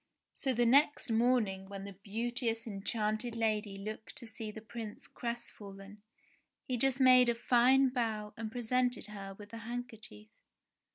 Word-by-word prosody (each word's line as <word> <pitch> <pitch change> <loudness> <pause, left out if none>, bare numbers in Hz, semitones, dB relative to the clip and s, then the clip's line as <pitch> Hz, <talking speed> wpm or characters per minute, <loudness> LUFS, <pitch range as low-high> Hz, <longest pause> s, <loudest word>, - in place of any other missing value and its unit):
So 270 - -1
the 240 -1 +2
next 280 +1 +4
morning 220 -5 +2
when 195 -1 -6
the 200 0 -7
beauteous 230 +4 -2
enchanted 215 +2 -2
lady 215 -3 0
looked 215 +5 -7
to 280 -5 -8
see 220 -1 -6
the 210 - -7
Prince 220 -1 -8
crestfallen, 205 -4 -7 0.7
he 255 - 0
just 270 +2 +1
made 255 -2 +7
a 235 - +2
fine 255 +3 +5
bow 220 -4 -2
and 220 -1 -5
presented 245 +1 0
her 195 -1 -7
with 205 +1 -12
the 230 - -7
handkerchief. 225 - -7
225 Hz, 150 wpm, -33 LUFS, 210-245 Hz, 0.7 s, made